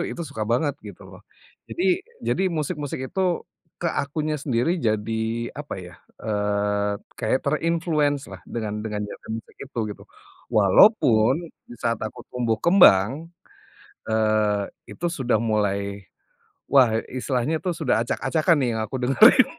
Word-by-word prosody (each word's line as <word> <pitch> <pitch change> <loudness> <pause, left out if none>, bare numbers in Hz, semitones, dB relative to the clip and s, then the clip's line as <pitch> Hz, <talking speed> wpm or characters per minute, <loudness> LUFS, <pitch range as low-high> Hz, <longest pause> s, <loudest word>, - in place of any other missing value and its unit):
itu - - -5
suka 110 -5 -3
banget 145 +5 +2 0.2
gitu - - -11
loh, - - -13 0.5
jadi 350 - -3 0.4
jadi 190 - +1
musik-musik 150 -2 -3
itu 190 - -1 0.6
ke 175 - +1
akunya 155 +2 -2
sendiri 130 +1 0 0.2
jadi 110 +1 -1 0.4
apa 150 - -6
ya, 90 - -12 0.3
eee, 105 -1 0 0.3
kayak 120 +3 +1
terinfluence 155 -2 +1
lah - - -9
dengan 110 -3 -4
dengan 105 -1 -3
genre 105 - -11
musik 115 - -13
itu 130 -2 -14
gitu. - - -11 0.5
Walaupun 120 - +4 0.2
di 120 - -9
saat 115 -1 -1
aku 110 - -5
tumbuh 120 -2 0
kembang, 150 - +5 0.8
eee, 110 -2 +2 0.3
itu 175 - -5
sudah 125 -4 +1
mulai, 100 -2 -1 0.7
wah, 130 -4 +6 0.2
istilahnya 130 +4 -1
itu 185 - -3
sudah 155 -7 0
acak-acakan 155 +8 +1
nih 130 - +1
yang 110 - -1
aku 110 - -7
dengerin. 220 - +6
125 Hz, 135 wpm, -24 LUFS, 110-155 Hz, 0.8 s, wah